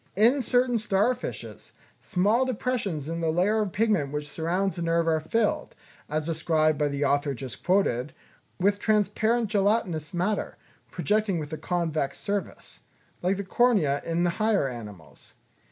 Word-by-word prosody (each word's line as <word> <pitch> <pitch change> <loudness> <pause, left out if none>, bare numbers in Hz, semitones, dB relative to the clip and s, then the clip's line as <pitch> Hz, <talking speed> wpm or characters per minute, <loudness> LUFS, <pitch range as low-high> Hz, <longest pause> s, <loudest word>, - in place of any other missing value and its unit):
In 235 +8 +4
certain 245 0 +2
star 210 +3 +2
fishes, 250 - -8 0.3
small 210 +7 +2
depressions 225 - -2
in 165 +1 -3
the 165 - +1
layer 200 +6 +2
of 205 -3 -2
pigment 205 -10 +1
which 150 0 -4
surrounds 175 +6 -1
the 175 - -5
nerve 165 0 +1
are 160 -1 +3
filled, 210 +8 -1 0.3
as 155 0 -1
described 155 -1 +1
by 150 - +2
the 140 0 -1
author 140 0 +1
just 125 -5 -8
quoted, 155 -9 +1 0.5
with 200 +2 +2
transparent 215 +1 +1
gelatinous 195 -7 +1
matter, 185 +4 -1 0.3
projecting 210 -3 0
with 155 0 -5
a - - -3
convex 160 -6 -1
surface, 200 -1 -4 0.4
like 185 +2 +1
the 200 - -3
cornea 190 - +2
in 165 +1 0
the 175 - +2
higher 215 -9 +2
animals. 105 -10 -10
180 Hz, 155 wpm, -26 LUFS, 155-215 Hz, 0.5 s, In